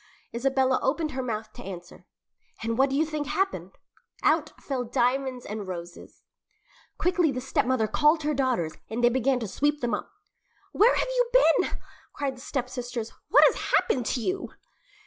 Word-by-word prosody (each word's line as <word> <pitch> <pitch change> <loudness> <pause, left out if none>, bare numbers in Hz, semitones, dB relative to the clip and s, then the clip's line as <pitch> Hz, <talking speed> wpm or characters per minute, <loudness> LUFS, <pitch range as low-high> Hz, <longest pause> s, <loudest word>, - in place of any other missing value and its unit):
Isabella 265 +1 +2
opened 305 +3 0
her 260 -1 -3
mouth 220 -3 -4
to - - -10
answer 180 -2 -9 0.6
and 230 0 -1
what 270 +3 +3
do 270 - -1
you 310 +3 +3
think 305 -2 -4
happened? 385 +6 -1 0.5
Out - - +3
fell 265 -3 -3
diamonds 250 +1 0
and 210 -2 -5
roses. 175 -1 -9 0.7
Quickly 355 -3 +2
the 255 - -3
stepmother 255 -2 +1
called 300 +6 +3
her 300 +1 0
daughters 255 - 0 0.2
and 235 +2 -3
they 240 - +7
began 260 +1 +1
to 225 - -3
sweep 290 +8 0
them 240 -4 -1
up. 205 - -3 0.6
"Where 450 +5 +5
have - - +1
you - - 0
been?" 325 -11 +5 0.4
cried 275 -2 -3
the 255 - -13
stepsisters. 250 -4 -4 0.2
"What - - +7
has - - -5
happened 255 - +1
to 245 - -1
you?" 370 - -2
260 Hz, 165 wpm, -27 LUFS, 235-295 Hz, 0.7 s, they